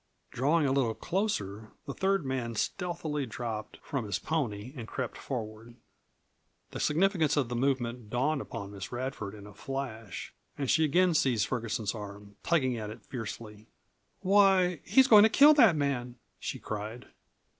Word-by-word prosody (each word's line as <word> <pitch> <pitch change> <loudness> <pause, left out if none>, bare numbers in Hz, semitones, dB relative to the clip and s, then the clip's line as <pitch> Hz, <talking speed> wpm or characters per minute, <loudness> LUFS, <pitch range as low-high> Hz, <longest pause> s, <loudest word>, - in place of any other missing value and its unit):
Drawing 145 +5 +2
a 135 - +2
little 130 -5 +1
closer, 110 - -2
the 140 - -5
third 195 -2 0
man 125 -3 -2
stealthily 155 - -2
dropped 110 -1 -5
from 140 -7 -3
his 100 - -1
pony 125 -7 -3
and 115 -4 -7
crept 130 0 -4
forward. 115 -2 -6 1.0
The - - -6
significance 160 -2 +2
of 135 -5 +1
this 120 - -2
movement 125 -4 -1
dawned 135 +5 0
upon 100 0 -7
Miss 100 -2 -7
Radford 120 -5 -4
in 100 -1 -11
a 105 - -12
flash, 115 -4 -6 0.2
and 140 -3 0
she 160 - +4
again 175 +4 +3
seized 125 -8 +2
Ferguson's 110 -4 -2
arm, 100 -1 -9
tugging 130 -8 +1
at 105 -1 -5
it 110 - -11
fiercely. 110 -3 -7 0.5
"Why, 190 -3 +4
he's 265 -1 +5
going 215 -4 +9
to 220 - +6
kill 290 +6 +7
that 230 - +6
man!" 130 -4 -1 0.2
she - - -4
cried. 110 +3 -6
130 Hz, 155 wpm, -30 LUFS, 110-155 Hz, 1.0 s, going